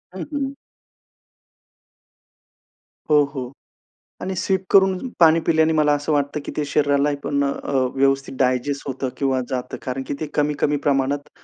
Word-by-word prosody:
हं, 190 - -5
हं. 275 -1 -2 2.6
हो, 150 -1 +6
हो. 130 -3 -5 0.7
आणि 190 +1 -3
सिप 190 +1 0
करून 190 -1 +5 0.2
पाणी 165 -1 +6
पिल्याने 160 -1 +3
मला 150 -1 +3
असं 145 +1 -1
वाटतं 145 +1 0
की - - -5
ते 150 - 0
शरीराला 145 0 +2
पण 140 0 0
अ, 140 0 -3 0.2
व्यवस्थित 135 0 +1
डायजेस्ट 130 +2 0
होतं 130 -1 -3
किंवा 135 -2 +1
जातं, 125 0 -4
कारण 130 +1 -4
की - - -2
ते 155 - -3
कमी-कमी 150 0 +1
प्रमाणात 140 +1 0
145 Hz, 140 wpm, -22 LUFS, 135-155 Hz, 2.6 s, हो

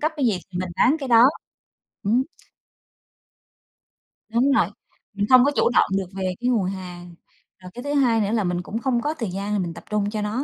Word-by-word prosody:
cấp 310 +2 0
cái 275 - +1
gì 205 -6 +1
thì 180 - -4
mình 185 0 -3
bán 270 +10 +4
cái 275 -3 -5
đó. 230 -1 +7 0.8
Ừm. 230 +6 +2 2.1
Đúng 240 +5 +2
rồi, 230 -11 +3 0.5
mình 205 0 -1
không 255 -1 +8
có 285 - +3
chủ - - +3
động - - +5
được 195 - -2
về 190 - -4 0.2
cái 245 +1 0
nguồn 220 -6 +1
hàng, 180 -2 -7 0.4
rồi 180 0 -12
cái 245 - -8
thứ 285 +1 -3
hai 245 -6 +3
nữa 205 0 -1
là 225 -2 +1
mình 175 -1 -1
cũng 210 +5 -5
không 240 -1 0
có 300 +3 -1
thời 230 -10 -4
gian 200 +1 -2
mình 170 -2 -4
tập - - -11
trung 210 -1 0
cho 215 0 -3
nó, 215 +6 -2
215 Hz, 220 wpm, -23 LUFS, 190-250 Hz, 2.1 s, không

